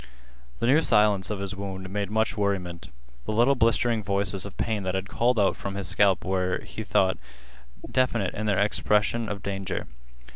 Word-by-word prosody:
The - - -2
new 140 +6 +5
silence 105 - +3
of 105 - -2
his 100 0 -5
wound 95 -1 -6
made 100 -1 -2
much 110 0 0
worriment. 95 -4 -2 0.4
The - - -2
little 120 +5 +4
blistering 115 -2 +2
voices 100 -1 -1
of 100 - -12
pain 110 -3 -1
that 95 -1 -2
had 95 0 -2
called 120 +2 +1
out 100 - +3
from 100 0 -5
his 100 -1 -4
scalp 100 -2 +3
were, 95 -1 0
he 110 - -6
thought, 95 -2 +2 0.7
definite 120 -7 +1
in 110 +1 -3
their 100 -3 +2
expression 105 +2 +1
of 100 -1 -5
danger. 100 -1 -3
100 Hz, 180 wpm, -26 LUFS, 95-110 Hz, 0.7 s, new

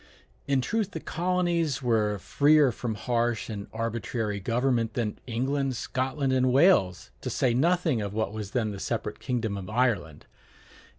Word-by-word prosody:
In 135 -2 +2
truth 205 - -1
the 160 - -4
colonies 170 -5 0
were 110 -4 +1
freer 145 +6 +4
from 115 0 -4
harsh 115 +2 -1
and 100 -2 -6
arbitrary 115 -2 -2
government 115 +2 0
than 115 -4 -2
England, 135 +3 -1
Scotland, 130 +3 -1
and 130 -1 +3
Wales, 130 - +3
to - - -3
say 125 -2 +1
nothing 160 -2 +2
of 100 -1 -3
what 110 0 -2
was 105 -2 -5
then 110 -1 -1
the 100 - -7
separate 105 -1 -3
kingdom 115 -6 -2
of 95 0 -7
Ireland. 110 - 0
120 Hz, 155 wpm, -27 LUFS, 110-135 Hz, -, freer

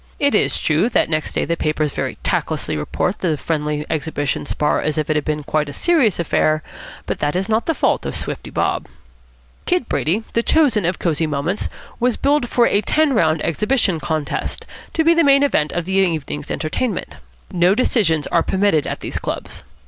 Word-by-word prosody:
It 285 0 +2
is 210 - +2
true 160 +9 +2
that 205 - +1
next 155 0 -1
day - - 0
the 170 - 0
papers 155 -2 -1
very - - -3
tactlessly - - -1
report 75 - -2
the 165 -5 0
friendly 150 0 -2
exhibition 145 -2 -2
spar 150 - 0
as 155 0 -1
if 155 0 0
it - - +1
had 150 - +1
been 150 -1 -2
quite 150 0 -1
a - - -7
serious 310 - +2
affair, 155 -2 +1 0.4
but - - -3
that 145 +2 -1
is 190 +1 0
not 220 +1 0
the 325 - +1
fault - - +1
of - - -4
Swifty - - -4
Bob. - - -1 0.8
Kid 355 -8 +1
Brady, 190 +9 0
the 230 - +2
chosen 255 - +3
of 175 +1 0
Cosy 160 -2 0
Moments, 155 +7 -2 0.3
was 245 0 +1
billed 280 -3 +1
for 240 - +3
a 205 - +3
"ten 305 +7 +2
round 160 -7 +2
exhibition 210 - +1
contest," 155 -2 -3 0.3
to 320 - +2
be 335 +1 +5
the 335 0 +3
main 275 -1 +5
event 155 - +1
of 175 -1 -2
the 190 - -3
evening's 160 -6 0
entertainment. 185 +7 -3 0.3
No 180 +2 +3
decisions 180 - +2
are 170 - +2
permitted 190 -6 +1
at - - -4
these - - -4
clubs. - - -5
170 Hz, 195 wpm, -20 LUFS, 155-230 Hz, 0.8 s, be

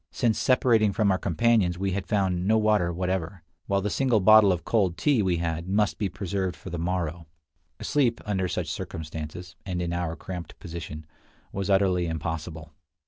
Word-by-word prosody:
Since 115 -3 0
separating 115 -5 +3
from 105 -1 +2
our 95 - +1
companions 95 0 +2
we 95 +1 -1
had 95 0 -3
found 95 -3 0
no 110 +1 +4
water 105 -5 +2
whatever, 90 0 -3 0.2
while 100 0 +1
the 105 +1 -2
single 130 -5 +2
bottle 105 0 +7
of 90 -2 -2
cold 95 -7 +1
tea 135 +3 +2
we 90 -3 +1
had 85 0 -3
must 105 +1 +1
be 100 -3 0
preserved 95 -1 -3
for - - -10
the 85 - -4
morrow. 85 -2 -2 0.6
Sleep, 125 -6 +1
under 95 -3 0
such 85 - -2
circumstances, 80 +2 -6
and 90 -3 -3
in 85 -1 -2
our 85 -2 -2
cramped 90 -3 -8
position, 80 -4 -7 0.5
was 100 0 -3
utterly 95 -3 +2
impossible. 80 0 -5
95 Hz, 175 wpm, -26 LUFS, 85-105 Hz, 0.6 s, bottle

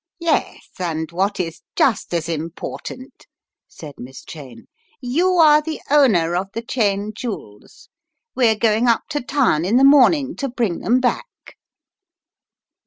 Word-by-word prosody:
"Yes, 335 -2 -1
and 160 -2 -3
what 195 +4 -1
is 165 -3 -4
just 235 -7 +1
as 170 -2 -2
important," 170 - -7 0.4
said 150 -3 -11
Miss 130 +1 -10
Cheyne, 135 -7 -11 0.3
"you 315 +9 0
are 305 -3 +6
the 315 +1 -5
owner 200 - +3
of 185 +2 -1
the 230 - -5
Cheyne 210 -4 -1
jewels. 210 - -8 0.5
We're 235 -4 +3
going 220 +2 +1
up 230 -1 +2
to 295 -2 -2
town 245 - +1
in 205 +7 +2
the 265 - +4
morning 280 +1 +5
to 275 - -3
bring 235 -8 -2
them 250 +2 +1
back." 260 - -1
225 Hz, 140 wpm, -20 LUFS, 170-270 Hz, 0.5 s, are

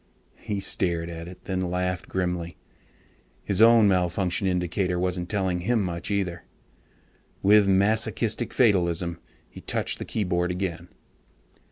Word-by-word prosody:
He 105 -3 -3
stared 85 -4 -1
at 85 0 -7
it, 90 +1 -12
then 95 -1 -2
laughed 90 -1 -2
grimly. 90 -2 -3 0.9
His 100 +1 0
own 115 -1 +7
malfunction 90 0 +1
indicator 90 0 0
wasn't 90 0 -2
telling 95 -4 0
him 110 +4 +1
much 85 -2 -3
either. 95 -4 -2 1.0
With 105 0 +6
masochistic 110 +4 +1
fatalism 85 -7 +1 0.3
he - - -12
touched - - -1
the - - -5
keyboard 90 -4 -1
again. 90 -1 -3
90 Hz, 125 wpm, -25 LUFS, 90-100 Hz, 1.0 s, own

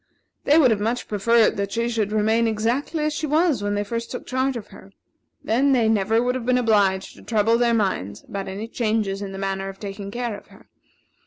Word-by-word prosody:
They 295 - +5
would 265 -7 +6
have 215 - +1
much 230 +4 -2
preferred 220 +2 +3
that 200 0 -2
she 230 0 0
should 220 -3 -1
remain 220 +2 +2
exactly 235 +8 -1
as 305 0 0
she 310 +1 -3
was 305 - +2
when 205 0 -1
they 205 - 0
first 230 +3 -4
took 250 - -6
charge 260 0 -1
of 220 - -9
her. 195 - -14 0.5
Then 270 +5 +2
they 235 -4 +3
never 220 +2 +2
would 250 0 +1
have 255 -2 -4
been 255 0 +3
obliged 205 -5 +1
to - - -14
trouble 225 0 +2
their 235 -1 +3
minds 105 - -2
about 195 -1 -6
any 200 +4 -5
changes 215 -4 -1
in 200 -1 -5
the 195 - -7
manner 195 0 -3
of 195 0 -10
taking 200 -1 -6
care 240 0 -3
of - - -13
her. - - -19
225 Hz, 225 wpm, -23 LUFS, 200-245 Hz, 0.5 s, would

